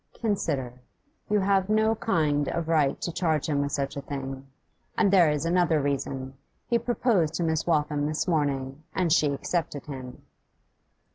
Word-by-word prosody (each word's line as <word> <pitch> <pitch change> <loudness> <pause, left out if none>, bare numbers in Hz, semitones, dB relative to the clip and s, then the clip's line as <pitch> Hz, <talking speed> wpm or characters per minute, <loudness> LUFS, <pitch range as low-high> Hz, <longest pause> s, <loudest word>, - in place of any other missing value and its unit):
'Consider. 140 - -2 0.5
You 210 -1 +3
have 195 0 +2
no 220 +1 +3
kind 150 -10 +1
of 170 -1 -2
right 155 -4 +2
to 170 - -2
charge 160 -3 0
him 145 -2 +1
with 140 0 -2
such 140 -1 -2
a 140 - -4
thing. 135 -1 -6 0.5
And 200 - +3
there 175 -5 +6
is 150 +1 -1
another 170 -2 +3
reason: 135 -1 -2 0.3
he 235 -1 +1
proposed 230 -8 +1
to 175 - -1
Miss 160 0 0
Waltham 150 -2 +1
this 155 +4 -2
morning, 140 -4 -1
and 175 -4 +2
she 155 - +4
accepted 145 0 -3
him. 130 -4 -8
155 Hz, 160 wpm, -27 LUFS, 140-180 Hz, 0.5 s, there